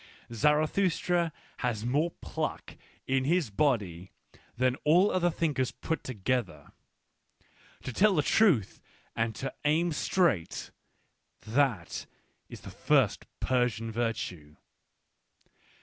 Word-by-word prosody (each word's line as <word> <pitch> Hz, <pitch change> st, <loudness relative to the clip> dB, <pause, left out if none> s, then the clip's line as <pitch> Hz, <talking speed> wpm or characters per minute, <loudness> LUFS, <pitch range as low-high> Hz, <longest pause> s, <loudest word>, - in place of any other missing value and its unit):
Zarathustra 165 Hz, -, +2 dB, 0.3 s
has 115 Hz, -4 st, -2 dB
more 145 Hz, +7 st, +1 dB
pluck -, -, -5 dB, 0.3 s
in 130 Hz, 0 st, +1 dB
his 160 Hz, -, +1 dB
body 100 Hz, -, 0 dB, 0.5 s
than 130 Hz, +1 st, +2 dB
all 175 Hz, +7 st, +5 dB
other 175 Hz, -1 st, +2 dB
thinkers 145 Hz, -6 st, 0 dB
put 160 Hz, -2 st, -4 dB
together. 120 Hz, -, -3 dB, 1.1 s
To 130 Hz, -, -5 dB
tell 205 Hz, -, +4 dB
the 150 Hz, -, +2 dB
truth 165 Hz, -, +3 dB, 0.3 s
and 115 Hz, -1 st, -1 dB
to 135 Hz, +3 st, -4 dB
aim 160 Hz, +4 st, +2 dB
straight: 155 Hz, -, 0 dB, 0.7 s
that 115 Hz, -6 st, 0 dB, 0.4 s
is -, -, -10 dB
the -, -, -9 dB
first -, -, +1 dB
Persian 120 Hz, -3 st, 0 dB
virtue. 105 Hz, -10 st, -3 dB
130 Hz, 100 wpm, -29 LUFS, 115-160 Hz, 1.1 s, all